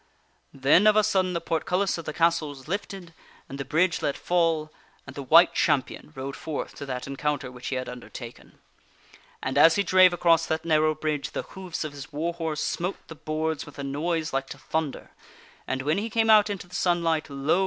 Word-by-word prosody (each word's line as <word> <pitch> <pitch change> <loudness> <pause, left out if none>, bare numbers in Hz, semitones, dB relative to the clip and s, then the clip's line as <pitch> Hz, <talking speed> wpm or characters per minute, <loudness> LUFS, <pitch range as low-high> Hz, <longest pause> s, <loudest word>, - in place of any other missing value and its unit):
Then 145 +10 +4
of 215 - +6
a 215 - +5
sudden 190 -3 +1
the 170 - -1
portcullis 180 +4 0
of 165 - -8
the - - -3
castle 165 -2 +2
was 135 -1 -11
lifted, 195 -2 -5 0.3
and 140 - -8
the - - -2
bridge 170 +5 +1
let 140 - -1
fall, 165 -3 0 0.3
and 130 - -11
the 140 - -5
White 165 +6 +6
Champion 150 -1 0
rode 135 +1 -5
forth 155 -2 -5
to 140 - -7
that 125 -1 -4
encounter 140 -1 -3
which 125 0 -9
he 135 - -2
had 130 0 -3
undertaken. 125 -1 -10 0.9
And, 130 +2 0
as 160 +2 +7
he 200 - +2
drave 185 -1 +6
across 165 -1 +3
that 160 +1 -2
narrow 155 -1 +3
bridge, 150 -1 -3
the - - -3
hoofs 185 -4 -6
of 155 - -5
his 140 +2 -10
war 160 +4 -2
horse 160 -2 -3
smote 180 +3 -3
the - - -7
boards 155 0 -3
with - - -13
a 140 - -5
noise 155 +3 -2
like 135 0 -1
to - - -9
thunder, 160 -3 -4 0.6
and 130 0 -2
when 155 +6 +1
he 220 +3 -3
came 225 0 +3
out 210 -1 +6
into 200 -3 -4
the 180 - -19
sunlight, 170 -3 +1
lo! 140 +5 +1
160 Hz, 205 wpm, -26 LUFS, 140-175 Hz, 0.9 s, as